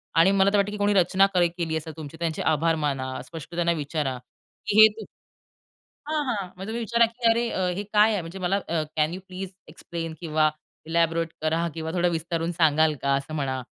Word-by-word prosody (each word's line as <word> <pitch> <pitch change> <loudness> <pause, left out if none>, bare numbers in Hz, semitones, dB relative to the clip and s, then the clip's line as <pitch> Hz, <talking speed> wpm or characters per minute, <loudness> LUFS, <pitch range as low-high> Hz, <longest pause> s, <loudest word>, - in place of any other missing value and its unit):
आणि 170 +4 +6
मला 195 0 +4
तर 205 - +3
वाटतं 200 +1 +1
की 210 - -5
कोणी 205 0 +2
रचना 190 0 +4
करे 175 -1 +4
केली 165 -2 -3
असं 160 +1 -6
तुमची, 155 0 -8
त्यांचे 165 -2 -2
आभार 160 +1 +2
माना, 130 -3 -2
स्पष्ट 165 0 -10
त्यांना 170 0 +2
विचारा, 145 -4 -2 0.5
की 205 - +1
"हे 220 - +11
तु" 220 - -7 1.0
हां, 310 -1 0
हां, 205 -6 -2
म्हणजे 190 +2 -7
तुम्ही 225 +2 -3
विचारा, 230 +1 +3
की 230 +1 0
"अरे 230 +1 +2 0.3
हे 200 - -3
अ, - - -11
काय 215 +1 +5
आहे?" 200 - 0
म्हणजे 170 +3 -8
मला 185 +2 0
अ, 165 -2 0
"कॅन 155 +1 +2
यू 185 - -6
प्लीज 185 0 -6 0.2
एक्सप्लेन 165 0 -6
किंवा 155 -2 +2 0.4
इलॅबोरेट 165 0 +1
करा 165 +2 +1
किंवा 160 0 -4
थोडं 175 -1 +2
विस्तारून 165 +1 -2
सांगाल 160 -2 +3
का," 140 0 +2
असं 150 +3 -5
म्हणा 130 -3 -2
170 Hz, 210 wpm, -25 LUFS, 155-195 Hz, 1.0 s, हे